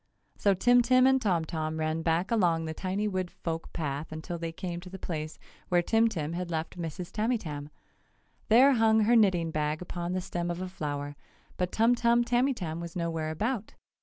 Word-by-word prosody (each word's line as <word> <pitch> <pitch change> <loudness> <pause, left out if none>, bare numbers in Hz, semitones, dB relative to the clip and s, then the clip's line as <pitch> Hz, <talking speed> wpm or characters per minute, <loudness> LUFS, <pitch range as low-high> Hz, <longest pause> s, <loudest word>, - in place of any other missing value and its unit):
So 200 -1 +2
Tim 245 +6 +5
Tim 255 +2 +4
and 265 0 +4
Tom 180 -7 +1
Tom 160 0 -3
ran 155 +1 -1
back 165 +5 0
along 170 -7 +2
the 160 - -4
tiny 190 +5 -2
wood 185 -3 -2
folk 165 -1 -5
path 150 -1 -4
until 160 +2 -5
they 165 0 -3
came 170 +1 -5
to 180 +1 -11
the 190 - -8
place 155 -4 -5 0.3
where 175 -1 +3
Tim 225 +4 +3
Tim 165 -7 -3
had 175 0 -3
left 160 -1 -3
Mrs. 170 0 -5
Tamytam. 200 -11 -2 0.8
There 255 +6 +7
hung 220 -2 +4
her 230 +3 +4
knitting 185 -7 +3
bag 150 0 -1
upon 175 0 -4
the 185 - 0
stem 175 -1 -3
of 175 0 -3
a 185 - -3
flower, 145 -5 -4 0.4
but 180 -1 -2
Tum 230 +2 +4
Tum 235 0 +3
Tamytam 240 - 0
was 170 -1 -7
no 170 -1 -1
where 160 -1 -2
about. 215 +7 -3
175 Hz, 195 wpm, -29 LUFS, 160-220 Hz, 0.8 s, There